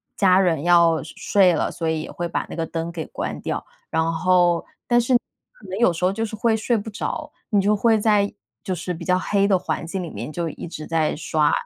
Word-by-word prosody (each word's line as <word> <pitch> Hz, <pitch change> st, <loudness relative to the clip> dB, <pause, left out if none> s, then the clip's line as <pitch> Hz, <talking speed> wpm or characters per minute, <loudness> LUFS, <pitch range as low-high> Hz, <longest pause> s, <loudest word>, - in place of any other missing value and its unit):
家 185 Hz, -2 st, +5 dB
人 170 Hz, -6 st, +2 dB
要 170 Hz, -2 st, +4 dB
睡 155 Hz, -, -10 dB
睡 190 Hz, -3 st, +4 dB
了， -, -, 0 dB
所 165 Hz, -1 st, -2 dB
以 160 Hz, -1 st, -1 dB
也 -, -, -7 dB
会 175 Hz, -, -3 dB
把 170 Hz, -, -2 dB
那 -, -, -6 dB
个 165 Hz, -, -2 dB
灯 165 Hz, +1 st, -4 dB
给 165 Hz, -2 st, -5 dB
关 -, -, -4 dB
掉， -, -, -3 dB, 0.2 s
然 160 Hz, 0 st, +1 dB
后 175 Hz, 0 st, +3 dB, 0.2 s
但 240 Hz, 0 st, +4 dB
是 240 Hz, +2 st, +1 dB, 0.4 s
可 -, -, -16 dB
能 185 Hz, -, -4 dB
有 235 Hz, -6 st, +5 dB
时 170 Hz, +2 st, -1 dB
候 185 Hz, -, +3 dB
就 225 Hz, -, -2 dB
是 220 Hz, -, -6 dB
会 225 Hz, +1 st, +2 dB
睡 225 Hz, +2 st, +1 dB
不 215 Hz, +1 st, -5 dB
着， 205 Hz, -, -4 dB, 0.2 s
你 205 Hz, -, +3 dB
就 205 Hz, +2 st, +3 dB
会 220 Hz, +1 st, +3 dB
在 205 Hz, -1 st, +2 dB, 0.3 s
就 195 Hz, -2 st, -2 dB
是 180 Hz, +1 st, -4 dB
比 170 Hz, 0 st, -8 dB
较 180 Hz, +2 st, +2 dB
黑 200 Hz, +1 st, +1 dB
的 195 Hz, -2 st, +3 dB
环 175 Hz, -, -3 dB
境 185 Hz, +3 st, -4 dB
里 175 Hz, -, -5 dB
面 150 Hz, -, -6 dB
就 170 Hz, +1 st, -2 dB
一 160 Hz, -, -8 dB
直 155 Hz, -2 st, -7 dB
在 160 Hz, -2 st, +1 dB
刷 155 Hz, -1 st, +1 dB
180 Hz, 265 characters per minute, -22 LUFS, 165-205 Hz, 0.4 s, 家